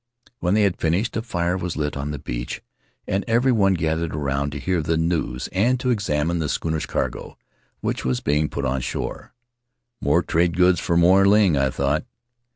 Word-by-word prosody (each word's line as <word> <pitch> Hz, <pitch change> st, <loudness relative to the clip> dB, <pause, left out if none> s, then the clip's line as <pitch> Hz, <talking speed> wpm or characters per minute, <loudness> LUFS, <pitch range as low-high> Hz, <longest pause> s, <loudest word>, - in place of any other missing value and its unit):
When 90 Hz, +3 st, +1 dB
they 105 Hz, -, +4 dB
had 100 Hz, -3 st, 0 dB
finished, 90 Hz, +8 st, 0 dB
a 115 Hz, -, 0 dB
fire 90 Hz, -6 st, -1 dB
was 90 Hz, -3 st, -4 dB
lit 75 Hz, -1 st, -2 dB
on 70 Hz, +1 st, -4 dB
the 75 Hz, -, -3 dB
beach -, -, -5 dB, 0.4 s
and 100 Hz, +1 st, 0 dB
everyone 115 Hz, -5 st, +3 dB
gathered 80 Hz, -1 st, -1 dB
around 70 Hz, -1 st, -1 dB
to 70 Hz, -, -5 dB
hear 90 Hz, +3 st, 0 dB
the 80 Hz, +1 st, 0 dB
news 80 Hz, -7 st, -1 dB
and 120 Hz, +7 st, +2 dB
to 125 Hz, 0 st, 0 dB
examine 85 Hz, -6 st, 0 dB
the 75 Hz, -2 st, -1 dB
schooner's 80 Hz, -1 st, -2 dB
cargo -, -, -3 dB, 0.4 s
which -, -, -2 dB
was 65 Hz, -1 st, 0 dB
being 75 Hz, +2 st, +1 dB
put -, -, -3 dB
on 65 Hz, +1 st, -1 dB
shore. -, -, -5 dB, 0.7 s
More 85 Hz, -, +2 dB
trade 85 Hz, +2 st, +1 dB
goods 90 Hz, -1 st, +4 dB
for 85 Hz, -, 0 dB
Moy 90 Hz, +3 st, +5 dB
Ling, 100 Hz, -3 st, +5 dB
I 70 Hz, -1 st, +2 dB
thought. 70 Hz, +3 st, 0 dB
85 Hz, 185 wpm, -23 LUFS, 75-95 Hz, 0.7 s, Moy